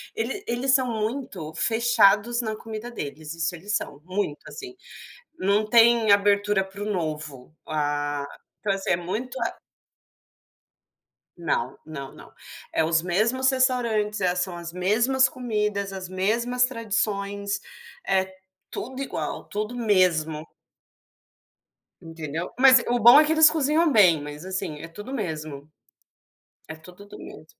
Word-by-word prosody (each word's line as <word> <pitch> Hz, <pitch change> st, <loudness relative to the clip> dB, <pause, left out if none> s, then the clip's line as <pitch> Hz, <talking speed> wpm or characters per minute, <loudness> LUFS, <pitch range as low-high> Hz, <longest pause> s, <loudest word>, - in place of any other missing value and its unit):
Ele 250 Hz, -, -3 dB
eles 245 Hz, +3 st, 0 dB
são 260 Hz, -2 st, +2 dB
muito 220 Hz, -, -4 dB
fechados 230 Hz, +1 st, +3 dB
na 220 Hz, -2 st, -3 dB
comida 225 Hz, +2 st, -8 dB
deles, 150 Hz, -, -7 dB
isso 165 Hz, +1 st, -2 dB
eles 205 Hz, +5 st, -3 dB
são, 145 Hz, -, -4 dB
muito 185 Hz, -5 st, -3 dB
assim. 375 Hz, -2 st, -9 dB, 0.6 s
Não 200 Hz, +3 st, +1 dB
tem 230 Hz, -1 st, +5 dB
abertura 200 Hz, 0 st, +3 dB
para 195 Hz, +1 st, -9 dB
o -, -, -2 dB
novo, 155 Hz, -6 st, -5 dB
ah 145 Hz, -1 st, -2 dB, 0.4 s
então, 205 Hz, -, -1 dB
assim, 195 Hz, -, -4 dB
é -, -, +3 dB
muito 210 Hz, +9 st, -5 dB
ah -, -, -3 dB, 1.8 s
Não, 135 Hz, -7 st, -2 dB
não 140 Hz, -4 st, -8 dB
não. -, -, -15 dB, 0.4 s
É -, -, +1 dB
os 160 Hz, 0 st, +2 dB
mesmos 225 Hz, +9 st, +1 dB
restaurantes, 235 Hz, -5 st, +1 dB
é 180 Hz, -1 st, +1 dB
são 180 Hz, 0 st, -2 dB
as 170 Hz, 0 st, -7 dB
mesmas 235 Hz, +9 st, +2 dB
comidas, 210 Hz, -5 st, -3 dB
as 190 Hz, -1 st, -6 dB
mesmas 235 Hz, +7 st, +1 dB
tradições, 205 Hz, -4 st, -2 dB, 0.5 s
é 190 Hz, -1 st, 0 dB, 0.3 s
tudo 260 Hz, +3 st, -6 dB
igual, 275 Hz, -, -4 dB
tudo 215 Hz, +3 st, -4 dB
mesmo. 175 Hz, -8 st, +1 dB, 1.5 s
Entendeu. 165 Hz, 0 st, -6 dB
Mas 260 Hz, -2 st, +8 dB
o 245 Hz, 0 st, +1 dB
bom 240 Hz, +5 st, +9 dB
é 305 Hz, -, +5 dB
que 305 Hz, -, 0 dB
eles 315 Hz, -1 st, +8 dB
cozinham 310 Hz, +1 st, +2 dB
bem, 180 Hz, -, +5 dB
mas 150 Hz, +3 st, -9 dB
assim, 185 Hz, -5 st, -4 dB
é 165 Hz, -, -8 dB
tudo 205 Hz, +9 st, -10 dB
o -, -, -5 dB
mesmo. 155 Hz, -, -6 dB, 1.0 s
É 160 Hz, -, -6 dB
tudo 180 Hz, +5 st, -15 dB
do -, -, -12 dB
mesmo. 155 Hz, -, -12 dB
200 Hz, 140 wpm, -24 LUFS, 165-235 Hz, 1.8 s, bom